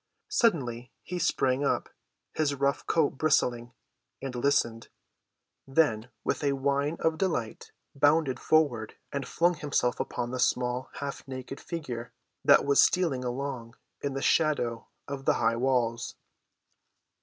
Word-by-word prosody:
Suddenly 125 - +1
he 180 0 -4
sprang 135 -5 +1
up, 140 - 0 0.5
his 145 -2 0
rough 140 +1 0
coat 150 -5 +1
bristling, 120 -6 +1 0.5
and 135 -2 -5
listened, 120 -3 +1 0.8
then 135 -6 +2
with - - -1
a 140 -1 +2
whine 140 +3 0
of 160 0 0
delight 145 - -2 0.2
bounded 145 -1 +3
forward 140 -9 +2 0.2
and 140 -1 -3
flung 175 +1 +2
himself 145 -6 0
upon 120 0 -3
the 130 - -3
small, 125 +1 0
half‐ 140 -1 -6
naked 130 +1 -7
figure 125 -9 -6 0.3
that - - +6
was 140 0 +5
stealing 165 -9 +2
along 125 -2 -4 0.3
in 140 -1 -3
the 135 - -3
shadow 125 -8 +1 0.2
of 140 -1 -6
the - - +4
high 115 0 +2
walls. 120 -2 0
135 Hz, 130 wpm, -28 LUFS, 125-150 Hz, 0.8 s, that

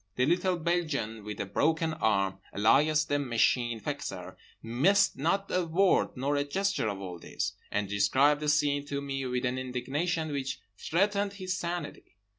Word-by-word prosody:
(The 125 - +2
little 180 +3 +1
Belgian 155 -10 -1
with 105 0 -6
the - - -3
Broken 160 - +1
Arm, 100 -7 +1 0.2
alias 150 +9 +4
the 145 - 0
Machine 120 -2 +1
Fixer, - - -5 0.3
missed 175 - +3
not 195 +7 0
a 185 - +2
word 175 -2 +2
nor 140 +3 0
a 145 - +2
gesture 195 - -1
of 100 -1 -4
all 90 -3 -7
this; - - -3 0.2
and 105 -1 -1
described 130 +9 +3
the 150 - 0
scene 145 -1 +2
to 140 -1 -2
me 135 -1 -3
with 125 +1 -1
an 125 +1 -1
indignation 145 +6 -2
which 135 -1 -3 0.2
threatened 200 - 0
his 185 -2 -3
sanity.) 170 - -5
145 Hz, 165 wpm, -29 LUFS, 120-170 Hz, 0.3 s, alias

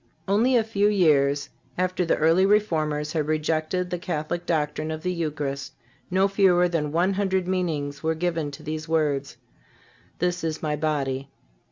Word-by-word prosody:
Only 225 +7 +3
a 230 - +3
few 210 -2 +1
years 145 -8 +3 0.3
after 185 0 0
the 165 - +2
early 165 +4 +4
Reformers 155 -7 +1
had 155 -3 -1
rejected 155 +3 0
the 180 - -2
Catholic 175 0 -3
doctrine 155 -1 -1
of 155 0 -5
the 180 - 0
Eucharist 145 -4 -3 0.4
no 190 +2 +3
fewer 190 -3 +4
than 160 -4 -1
one 175 +5 +2
hundred 190 -2 0
meanings 155 -6 -2
were 160 0 0
given 165 -2 -1
to 140 - -10
these 155 +1 -5
words: 145 -4 0 0.8
"This 180 0 -1
is 160 -1 -3
My 150 -1 0
body." 140 -3 -2
160 Hz, 160 wpm, -25 LUFS, 150-180 Hz, 0.8 s, early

